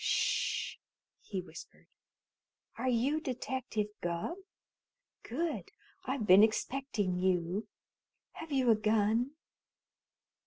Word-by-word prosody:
"Sh!" -, -, +1 dB, 0.4 s
he 195 Hz, -3 st, -4 dB
whispered. -, -, -12 dB, 0.9 s
"Are 260 Hz, -, -1 dB
you 255 Hz, +6 st, +2 dB
Detective 255 Hz, -5 st, -2 dB, 0.2 s
Gubb? 175 Hz, -, -2 dB, 0.8 s
Good! 320 Hz, +7 st, -3 dB, 0.4 s
I've 260 Hz, -4 st, -1 dB
been 190 Hz, 0 st, +8 dB
expecting 220 Hz, -4 st, +1 dB
you. 185 Hz, +2 st, 0 dB, 0.6 s
Have 325 Hz, -1 st, -9 dB
you 260 Hz, -4 st, +4 dB
a -, -, +6 dB
gun?" 220 Hz, +4 st, +2 dB
225 Hz, 90 wpm, -33 LUFS, 200-265 Hz, 0.9 s, been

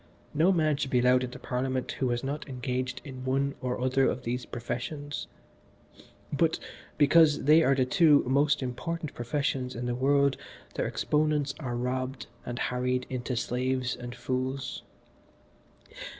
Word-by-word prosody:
No 165 Hz, +6 st, +4 dB
man 155 Hz, -5 st, +2 dB
should 140 Hz, -, -2 dB
be 125 Hz, -, +2 dB
allowed 125 Hz, +1 st, +4 dB
into 125 Hz, -1 st, -5 dB
Parliament 130 Hz, 0 st, -2 dB
who 130 Hz, -, +1 dB
has 120 Hz, +1 st, -1 dB
not 145 Hz, +2 st, -4 dB
engaged 125 Hz, 0 st, -3 dB
in 130 Hz, -3 st, -8 dB
one 135 Hz, +2 st, 0 dB
or 125 Hz, -1 st, -2 dB
other 130 Hz, +1 st, +2 dB
of 125 Hz, -, -3 dB
these 125 Hz, +1 st, -3 dB
professions, 130 Hz, +5 st, -4 dB, 1.1 s
but -, -, +2 dB, 0.4 s
because 150 Hz, +1 st, +5 dB
they 155 Hz, +3 st, +6 dB
are 135 Hz, -3 st, +4 dB
the 130 Hz, -1 st, +2 dB
two 155 Hz, -1 st, +5 dB
most 140 Hz, +2 st, +2 dB
important 155 Hz, +5 st, -4 dB
professions 130 Hz, +1 st, -2 dB
in 120 Hz, +1 st, -4 dB
the 120 Hz, -, -1 dB
world 140 Hz, +2 st, +3 dB, 0.4 s
their -, -, -1 dB
exponents 150 Hz, -2 st, +1 dB
are 125 Hz, -5 st, -3 dB
robbed 130 Hz, +1 st, -2 dB, 0.2 s
and 120 Hz, -, -4 dB, 0.2 s
harried 125 Hz, 0 st, 0 dB
into 125 Hz, 0 st, -2 dB
slaves 125 Hz, +1 st, -1 dB
and 120 Hz, -1 st, -7 dB
fools." 130 Hz, +2 st, -3 dB
130 Hz, 150 wpm, -29 LUFS, 125-145 Hz, 1.1 s, they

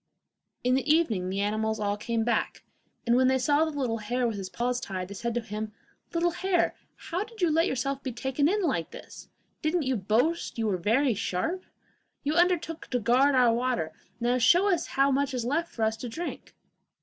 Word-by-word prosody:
In 250 Hz, +1 st, +2 dB
the 270 Hz, +3 st, +2 dB
evening 225 Hz, -, +2 dB
the 195 Hz, +1 st, -1 dB
animals 220 Hz, +1 st, 0 dB
all 205 Hz, -1 st, 0 dB
came 225 Hz, +2 st, -1 dB
back; 235 Hz, -1 st, -1 dB, 0.4 s
and 235 Hz, 0 st, +3 dB
when 255 Hz, +1 st, +4 dB
they 260 Hz, 0 st, +3 dB
saw 290 Hz, +4 st, +3 dB
the 315 Hz, -2 st, -3 dB
little 230 Hz, -4 st, -1 dB
hare 240 Hz, +3 st, 0 dB
with 225 Hz, -, -2 dB
his 195 Hz, -2 st, -5 dB
paws 245 Hz, +4 st, -1 dB
tied, 185 Hz, -3 st, -5 dB
they -, -, -6 dB
said 235 Hz, +4 st, -3 dB
to 240 Hz, -, 0 dB
him: 215 Hz, -1 st, -5 dB, 0.4 s
'Little 345 Hz, +1 st, +1 dB
hare, 370 Hz, 0 st, +1 dB, 0.2 s
how 355 Hz, +4 st, -3 dB
did 450 Hz, +1 st, -15 dB
you 350 Hz, -4 st, +3 dB
let 325 Hz, +2 st, +3 dB
yourself 270 Hz, +2 st, -2 dB
be 260 Hz, -, -4 dB
taken 265 Hz, +5 st, 0 dB
in 410 Hz, +1 st, +1 dB
like 175 Hz, -, 0 dB
this? -, -, -11 dB, 0.3 s
Didn't 315 Hz, +1 st, +1 dB
you 260 Hz, -1 st, 0 dB
boast 235 Hz, -, 0 dB
you 225 Hz, -, 0 dB
were 200 Hz, -4 st, +1 dB
very 230 Hz, +8 st, +2 dB
sharp? 225 Hz, -, -2 dB, 0.6 s
You 295 Hz, +1 st, 0 dB
undertook 340 Hz, -1 st, +1 dB
to 250 Hz, -, 0 dB
guard 255 Hz, +5 st, +4 dB
our 245 Hz, -2 st, +5 dB
water; 235 Hz, -10 st, -1 dB, 0.3 s
now 245 Hz, +1 st, +1 dB
show 355 Hz, -, +5 dB
us 340 Hz, -1 st, -1 dB
how 275 Hz, +1 st, +2 dB
much 275 Hz, 0 st, 0 dB
is 240 Hz, -2 st, -2 dB
left 320 Hz, +7 st, -1 dB
for 225 Hz, -, -3 dB
us 220 Hz, 0 st, +1 dB
to 240 Hz, +2 st, -6 dB
drink! 340 Hz, +9 st, -6 dB
250 Hz, 210 wpm, -28 LUFS, 220-310 Hz, 0.6 s, our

